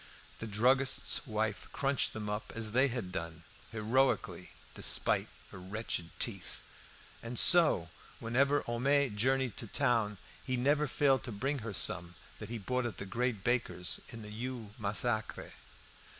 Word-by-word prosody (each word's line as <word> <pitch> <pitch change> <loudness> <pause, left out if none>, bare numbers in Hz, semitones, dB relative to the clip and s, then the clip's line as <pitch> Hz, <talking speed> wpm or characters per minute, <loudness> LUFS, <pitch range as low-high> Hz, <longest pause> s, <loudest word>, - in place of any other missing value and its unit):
The 110 - -5
druggist's 130 +8 +2
wife 110 -1 -2
crunched 140 -1 0
them 110 -1 -5
up 105 +1 -4
as 110 -1 -3
they 130 +5 +3
had 120 -8 -4
done 85 -1 -6 0.3
heroically, 115 +5 0 0.2
despite - - +1 0.2
her 100 - -10
wretched 95 -2 -4
teeth. - - -4 0.6
And 120 +1 -6
so 160 - +7 0.3
whenever 140 +5 +1
Homais 135 +3 +1
journeyed 130 +2 0
to 115 - -4
town, 115 -4 +1 0.3
he 130 -1 -2
never 145 +4 +2
failed 135 0 +2
to 120 - -6
bring 135 +7 -2
her 115 - -9
home - - -6
some 85 +1 0 0.2
that 105 - -8
he 120 - -4
bought 125 +4 -2
at 105 -6 -7
the - - -6
great 115 0 -2
baker's 90 -8 +1
in 115 -1 -8
the 105 - -9
Rue 115 -1 -6
Massacre. 110 +2 -2
115 Hz, 150 wpm, -32 LUFS, 105-130 Hz, 0.6 s, so